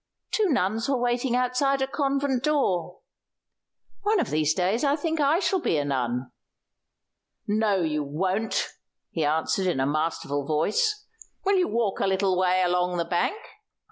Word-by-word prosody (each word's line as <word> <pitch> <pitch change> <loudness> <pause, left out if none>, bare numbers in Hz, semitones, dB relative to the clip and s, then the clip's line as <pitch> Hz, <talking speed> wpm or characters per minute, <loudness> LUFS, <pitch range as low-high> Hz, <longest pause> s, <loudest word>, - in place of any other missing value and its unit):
"Two 425 -3 +2
nuns 225 - 0
were 275 - +2
waiting 245 +1 0
outside 255 +2 +1
a 265 - +1
convent 275 -2 -1
door. 190 - 0 1.0
One 415 0 +2
of - - -1
these 155 0 +2
days 190 +7 0
I 285 0 +3
think 320 +1 -2
I 295 +2 +3
shall 380 0 +1
be 165 - 0
a 145 - 0
nun." 125 -2 -2 1.1
"No, 210 -2 +1
you 150 -2 0
won't," 185 +9 -1 0.4
he 165 - -1
answered 160 +5 0
in 175 -7 0
a 135 - +2
masterful 145 -1 -1
voice. 415 - 0 0.4
"Will 395 0 +3
you 365 - +2
walk 220 -3 -1
a - - +1
little 190 0 +1
way 185 0 +2
along 180 0 +1
the 170 - 0
bank? 175 - 0
200 Hz, 160 wpm, -26 LUFS, 165-275 Hz, 1.1 s, I